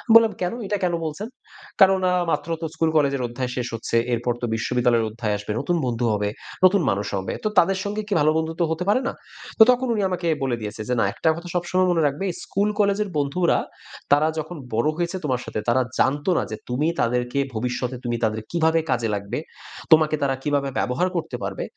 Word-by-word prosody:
বললাম 230 -1 +7
"কেন? 180 +2 0
এইটা 205 +1 -1
কেন 180 -1 +1
বলছেন?" 160 +8 -4 0.5
কেননা 190 -1 +5 0.2
মাত্র 150 +1 -1
তো - - -2
স্কুল 160 0 +1
কলেজের 140 -3 +2
অধ্যায় 125 +1 -4
শেষ 125 -1 -2
হচ্ছে। 115 - -3 0.2
এরপর 120 +1 0
তো - - 0
বিশ্ববিদ্যালয়ের 120 0 +1
অধ্যায় 110 -1 -2
আসবে। 105 +1 -6
নতুন 175 +5 0
বন্ধু 120 -1 -1
হবে, 105 0 0 0.4
নতুন 190 +1 +5
মানুষ 100 +1 -1
হবে। 95 - -3
তো - - +1
তাদের 190 +3 +3
সঙ্গে 210 +1 -2
কি 210 - -1
ভালো 155 +1 +4
বন্ধুত্ব 160 +2 -1
হতে 160 +2 -1
পারে 235 +5 +3
না? - - -2 0.5
তো - - +12
তখন 250 +1 0
উনি 215 - 0
আমাকে 180 -2 -2 0.2
বলে 130 -3 0
দিয়েছে 105 0 -5
যে - - +2
"না - - +3
একটা 160 - +1
কথা 170 +2 -8
সবসময় 185 +1 +1
মনে 170 -2 +2
রাখবে 145 +7 -3 0.2
স্কুল 200 +2 0
কলেজের 205 0 +2
বন্ধুরা, 150 +5 +2 0.5
তারা 145 +2 +5
যখন 155 +3 -6 0.2
বড় 115 +6 +2
হয়েছে 175 +2 -1
তোমার 130 -3 0
সাথে, - - -4
তারা 130 +2 +3 0.2
জানতো 145 +6 +2
না - - +1
যে 110 - -4
তুমি 130 +6 0
তাদেরকে 125 +3 0
ভবিষ্যতে 125 +2 -2
তুমি 120 -1 -1
তাদের 110 0 0
কীভাবে 165 -1 +3
কাজে 120 -2 +1
লাগবে? 100 +4 -4 0.5
তোমাকে 155 -1 +6
তারা 135 -1 +1
কীভাবে 145 -2 0
ব্যবহার 125 +9 0
করতে 170 - -3
পারবে? - - -3
145 Hz, 200 wpm, -23 LUFS, 120-180 Hz, 0.5 s, তো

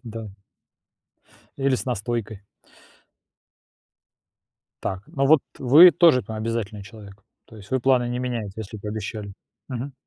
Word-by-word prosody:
Да. 115 -1 -7 1.3
Или 135 -1 +2
с - - -5
настойкой. 115 -3 -3 2.4
Так. 95 0 -3
Ну 135 0 0
вот 155 -1 +6 0.2
вы 150 +8 +8
тоже 165 -8 +4
там 110 - -7
обязательный 110 -2 -4
человек. 100 -1 -13 0.2
То 110 - -15
есть 95 -2 -14
вы 130 - 0
планы 125 -1 +2
не 125 0 -3
меняете, 120 -5 -4
если 110 +1 -8
пообещали. 105 0 -6 0.4
Мгм. 130 +2 -5
115 Hz, 125 wpm, -23 LUFS, 105-130 Hz, 2.4 s, вы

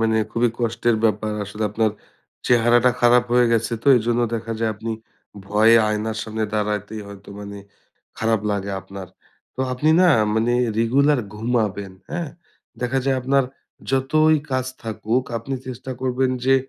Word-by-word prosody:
মানে 110 0 +2
খুবই 120 +1 +2
কষ্টের 115 0 +1
ব্যাপার 110 0 +1
আসলে 105 +2 -6
আপনার 110 +1 +1 0.6
চেহারাটা 120 +1 +4
খারাপ 120 0 +5
হয়ে 125 0 +5
গেছে 115 +1 0
তো, - - -13
এইজন্য 120 +1 +1
দেখা 115 0 -4
যায় 115 -1 0
আপনি 115 +2 -5 0.6
ভয়ে 110 +3 +5
আয়নার 110 +1 -2
সামনে 110 0 -3
দাঁড়াইতেই 105 0 -2
হয়তো 100 -1 -12
মানে 100 0 -8 0.6
খারাপ 110 -1 +1
লাগে 100 -1 -2
আপনার। 95 0 -9 0.5
তো - - -5
আপনি 145 +5 +1
না 180 - +6 0.3
মানে 115 +2 +1 0.3
রেগুলার 135 +5 +3
ঘুমাবেন 105 -4 -1 0.2
হ্যাঁ? 175 -2 -3 0.5
দেখা 125 +2 0
যায় 135 -1 +2
আপনার 135 +1 +2 0.5
যতই 155 +4 +3
কাজ 130 -1 0 0.2
থাকুক 115 +3 -1
আপনি 115 +4 -4
চেষ্টা 130 +1 -7
করবেন 130 0 0
যে 135 +1 +5
115 Hz, 145 wpm, -22 LUFS, 110-125 Hz, 0.6 s, না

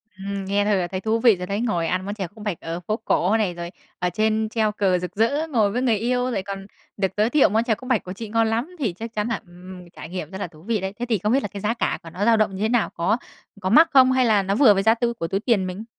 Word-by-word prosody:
Ừm, 195 0 -5
nghe 200 +1 +1
thôi 210 - +2
là 180 -2 0
thấy 185 +1 -5
thú 225 +1 0
vị 225 -3 +5
rồi 180 0 -6
đấy. 200 +3 -2
Ngồi 175 -9 0
ăn 185 +1 -1
món 205 - -3
chè 195 -4 -4
khúc 210 +4 -13
bạch 205 -6 -3
ở 165 +1 -4
phố 210 +5 -3
cổ 205 +5 +2
này, 195 -5 0
rồi 170 0 -6 0.3
ở 180 - 0
trên 220 +1 +1
treo 220 -2 +1
cờ 190 -3 +1
rực 180 +1 -6
rỡ, 280 +9 +1
ngồi 220 -9 +2
với 245 +3 -1
người 235 -4 +2
yêu 250 +3 0
lại 195 -4 -2
còn 195 0 -6 0.3
được 195 -2 0
giới 215 +2 +3
thiệu 295 -7 +4
món 220 +3 +2
chè 235 -2 +1
khúc 255 +4 -11
bạch 250 -6 +2
của 185 - -6
chị 215 +2 -8
ngon 225 0 +2
lắm, 235 +11 -2
thì 220 -10 -1
chắc 225 +5 -8
chắn 210 0 -1
là 235 - -2
ừm, 180 0 -12
trải 160 - -10
nghiệm 180 -3 -6
rất 190 - -6
là - - -2
thú 155 -1 -18
vị 220 -1 -1
đấy. 190 +1 -3
Thế 245 - -2
thì 220 - +2
không 210 +3 -1
biết 270 - +3
là - - -1
cái 200 0 -8
giá 215 +3 0
cả 235 - -1
của 165 - -9
nó 185 +5 -3
dao 230 -1 +5
động 210 -3 +1
như 190 - -6
thế 220 - +1
nào? 240 -2 +2
Có 195 +7 +1 0.4
có 185 - -1
mắc 320 +11 +6
không 260 -2 +6
hay 260 -1 +3
là 210 -4 +3
nó 195 +1 0
vừa 225 -4 +6
với 195 - 0
giá 225 +2 +5
tu 235 0 -1
của 165 -8 -4
túi 195 +4 -1
tiền 205 -4 +1
mình? 185 +4 -6
210 Hz, 320 wpm, -23 LUFS, 185-230 Hz, 0.4 s, mắc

